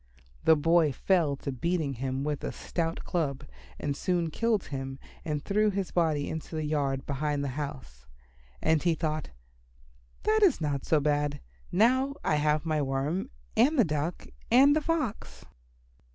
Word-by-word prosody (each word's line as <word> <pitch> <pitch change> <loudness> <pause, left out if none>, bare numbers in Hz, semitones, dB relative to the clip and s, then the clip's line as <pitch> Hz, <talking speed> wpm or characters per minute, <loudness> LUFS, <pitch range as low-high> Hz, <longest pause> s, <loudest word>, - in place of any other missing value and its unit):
The 160 - +7
boy 165 0 +3
fell 160 +1 +1
to 140 0 -5
beating 155 +2 -1
him 130 +2 -3
with 150 -1 -2
a - - -2
stout 165 -1 -3
club 150 -5 -2 0.3
and 145 -1 -2
soon 170 0 0
killed 225 +1 +1
him 135 -1 -5 0.3
and 150 -2 -3
threw 210 +1 +2
his 195 -2 -2
body 155 -4 +1
into 160 +1 -5
the 155 -1 -2
yard 140 -3 -1
behind 145 0 -1
the 140 - -2
house. 130 - -7 0.6
And 160 -1 +3
he 170 -2 +2
thought, 155 -1 -2 0.9
"That 435 0 +3
is 380 -9 +5
not 145 -4 -2
so 155 - +4
bad. 145 0 0 0.3
Now 260 +8 +3
I 150 - +2
have 150 +1 +1
my 155 -2 +1
Worm 140 +6 -1 0.3
and 295 +5 +4
the 240 - +5
Duck 155 +2 -2 0.2
and 270 +5 +6
the 310 - +2
Fox." 250 - -3
155 Hz, 160 wpm, -29 LUFS, 140-180 Hz, 0.9 s, The